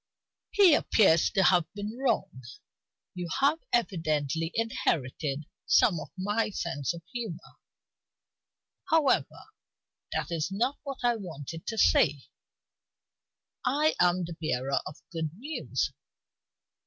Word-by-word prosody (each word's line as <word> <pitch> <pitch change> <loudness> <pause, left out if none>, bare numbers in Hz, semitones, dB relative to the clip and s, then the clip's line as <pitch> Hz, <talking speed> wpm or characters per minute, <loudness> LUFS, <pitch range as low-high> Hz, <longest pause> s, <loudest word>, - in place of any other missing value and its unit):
He 395 -6 +6
appears 190 - +4
to 195 - +2
have 175 -2 +3
been 205 +2 -5
wrong; 240 - -1 0.7
you 180 -1 -5
have 285 +4 +3
evidently 160 - 0
inherited 155 - -1 0.2
some 175 -6 +4
of - - -8
my 205 +4 0
sense 165 -8 -2
of 170 - -10
humor. 230 -9 -6 1.3
However, 315 -4 +2 0.7
that - - -2
is 165 0 -1
not 245 +8 -1
what 275 -3 -7
I 240 -1 +3
wanted 165 -4 -8
to 225 - -3
say; 145 -8 +4 1.4
I 295 +5 +2
am 180 0 +3
the 170 - -6
bearer 135 -3 0
of 150 - -8
good 165 -2 -2
news. 295 +7 -2
185 Hz, 115 wpm, -29 LUFS, 160-240 Hz, 1.4 s, He